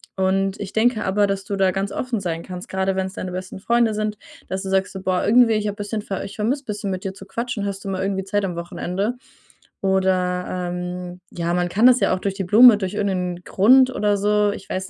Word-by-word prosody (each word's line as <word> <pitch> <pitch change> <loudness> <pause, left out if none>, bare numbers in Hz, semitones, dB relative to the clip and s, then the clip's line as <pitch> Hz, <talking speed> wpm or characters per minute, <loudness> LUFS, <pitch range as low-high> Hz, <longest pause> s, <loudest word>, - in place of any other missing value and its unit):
Und 190 +1 0
ich 200 -2 -6
denke 225 0 +2
aber, 205 +2 +2
dass 195 0 -3
du 200 - -3
da 190 -1 +2
ganz 195 +1 -2
offen 250 -1 -2
sein 170 -3 -3
kannst, 180 -1 -8
grade 190 0 -1
wenn's 190 0 -2
deine 185 -2 -5
besten 185 +1 -6
Freunde 235 +2 +2
sind, 210 0 -2 0.3
dass 190 +1 -3
du 195 - -5
sagst 190 0 +1
so: 190 - -6
„Boah, 185 -1 0
irgendwie, 230 +2 +5
ich 215 -1 0
habe 205 - -3
bisschen 205 +1 -3
ver 195 -2 -4
ich 200 - -9
vermisse 250 +7 -1
bisschen, 205 -2 -4
mit 185 0 -4
dir 190 - -3
zu 195 - -12
quatschen. 230 +2 -4
Hast 200 0 -4
du - - -3
mal 190 -1 -2
irgendwie 195 0 -1
Zeit 205 +1 -1
am 180 -2 -4
Wochenende?“ 180 +6 -3 0.7
Oder, 185 -2 +1 0.3
ähm, 180 0 -6
ja, 170 0 -2
man 175 0 0
kann 215 +6 +2
das 255 0 +5
ja - - +3
auch 185 - -1
durch 195 +1 -2
die 195 - -3
Blume 220 +5 +8
durch 195 -1 -4
irgend 200 -1 0
'nen 180 -1 -3
Grund 255 +6 +5
oder 205 -1 +1
so. 210 +1 +2
Ich 200 - -8
weiß 190 0 -3
195 Hz, 240 wpm, -22 LUFS, 185-210 Hz, 0.7 s, Blume